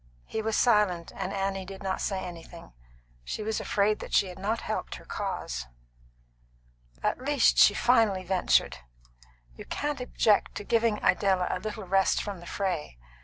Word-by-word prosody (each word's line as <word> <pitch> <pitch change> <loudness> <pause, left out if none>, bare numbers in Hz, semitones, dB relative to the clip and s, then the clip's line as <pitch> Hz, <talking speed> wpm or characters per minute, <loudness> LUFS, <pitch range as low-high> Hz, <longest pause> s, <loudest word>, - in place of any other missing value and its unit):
He 220 - -3
was 220 0 -1
silent, 210 -8 +2
and 190 -1 -3
Annie 195 -1 -2
did 190 +1 -9
not 190 -1 -2
say 190 -2 -1
anything. 170 - -10 0.5
She 215 - -4
was 220 0 -1
afraid 210 -2 +1
that - - -4
she 195 - +3
had 180 - -10
not 215 +4 -1
helped - - -4
her - - -12
cause. 65 +1 -4 1.4
"At - - 0
least," 280 -1 +3
she 205 - +7
finally 225 -6 +3
ventured, 185 0 +2 0.8
"you - - -9
can't 290 -2 -3
object 220 -4 +2
to - - -5
giving 225 0 +2
Idella 190 -3 +3
a - - -2
little 215 +1 -5
rest 195 +1 +3
from 200 -3 -5
the 175 - -12
fray. 180 - -3
195 Hz, 165 wpm, -28 LUFS, 185-220 Hz, 1.4 s, she